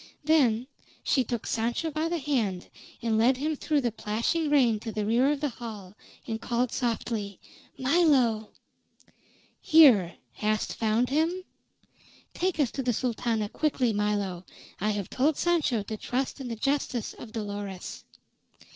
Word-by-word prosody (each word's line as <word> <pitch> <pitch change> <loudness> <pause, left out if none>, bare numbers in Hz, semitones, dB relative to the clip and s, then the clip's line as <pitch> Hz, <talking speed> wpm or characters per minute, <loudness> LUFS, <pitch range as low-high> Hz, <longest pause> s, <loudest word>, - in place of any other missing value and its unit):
Then 260 -7 +3 0.4
she 265 - +2
took 235 -1 -4
Sancho 235 +8 -1
by 310 +2 -1
the 345 - 0
hand, 235 - -1 0.3
and 225 -2 +1
led 250 +3 +4
him 305 +3 -1
through 295 0 0
the 240 -2 0
plashing 230 +10 -1
rain 250 -7 +4
to 225 +1 -5
the 215 -1 -2
rear 240 +6 +3
of 295 -1 -2
the 295 - 0
hall 215 -6 -8 0.3
and 225 0 -4
called 240 0 0
softly: 225 -5 -2 0.4
"Milo!" 260 -7 +3 1.1
"Here. 245 - +6 0.2
Hast 215 0 -1
found 225 +2 +1
him?" 330 +5 +1 0.9
"Take 365 -2 -1
us 275 -5 +2
to 270 - -3
the 250 -2 0
Sultana 230 -2 -1
quickly, 255 -2 0
Milo. 205 -3 -1 0.4
I 210 - 0
have 205 -3 -2
told 280 +3 +2
Sancho 310 -11 +1
to 215 +1 -5
trust 260 +5 -3
in 260 - -5
the 230 - -4
justice 260 -1 -1
of 230 - -11
Dolores." 205 -4 -6
240 Hz, 145 wpm, -28 LUFS, 215-285 Hz, 1.1 s, Here